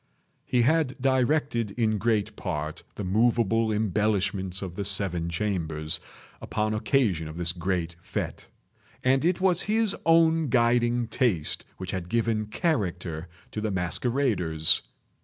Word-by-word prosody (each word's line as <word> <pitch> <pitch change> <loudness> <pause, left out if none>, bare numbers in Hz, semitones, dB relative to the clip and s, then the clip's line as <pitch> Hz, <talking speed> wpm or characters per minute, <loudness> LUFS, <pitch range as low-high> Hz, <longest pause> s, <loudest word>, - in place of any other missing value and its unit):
He 120 -1 +2
had 145 0 +1
directed, 130 -2 +1
in 110 -3 +1
great 110 0 0
part, 75 -6 -4
the 105 - -5
moveable 115 +2 +2
embellishments 100 -3 0
of 90 -3 -5
the 100 - -3
seven 95 -4 -1
chambers, 80 -4 -2 0.4
upon 110 0 -1
occasion 110 - +1
of 80 +1 -8
this 85 -1 +1
great 85 -1 -2
fête; - - -4 0.6
and 130 +2 +3
it 175 +2 +2
was 185 -2 +2
his 220 -1 +1
own 165 -2 +4
guiding 120 0 +2
taste 110 - 0
which 95 -1 -5
had 90 -3 -4
given 115 -1 0
character 90 - -2 0.2
to 105 - -4
the 110 - -1
masqueraders. 90 - +2
110 Hz, 130 wpm, -27 LUFS, 90-125 Hz, 0.6 s, own